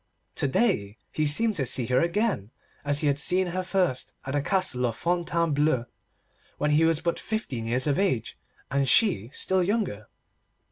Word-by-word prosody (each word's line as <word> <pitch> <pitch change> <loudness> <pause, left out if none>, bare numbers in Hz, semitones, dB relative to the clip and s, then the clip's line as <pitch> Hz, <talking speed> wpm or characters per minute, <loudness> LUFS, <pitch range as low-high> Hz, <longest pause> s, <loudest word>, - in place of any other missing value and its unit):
To - - +1
day 130 - 0
he 155 -1 0
seemed 215 +9 +2
to 135 - 0
see 125 - 0
her 125 +3 +2
again, 170 - 0 0.3
as 145 0 +1
he 150 - +1
had 140 0 +1
seen 185 +5 +2
her 185 - -1
first 180 -8 -1
at 135 - -4
the 145 - +1
Castle 140 -8 +1
of 115 - -5
Fontainebleau, 165 -6 0 0.7
when 150 0 0
he 155 +2 +4
was 165 -1 +2
but 170 0 -1
fifteen 140 - -4
years 125 +3 0
of 145 +1 +1
age, 155 - 0 0.4
and 140 0 +1
she 175 - +4
still 190 +5 +1
younger. 180 - -1
150 Hz, 175 wpm, -26 LUFS, 130-185 Hz, 0.7 s, he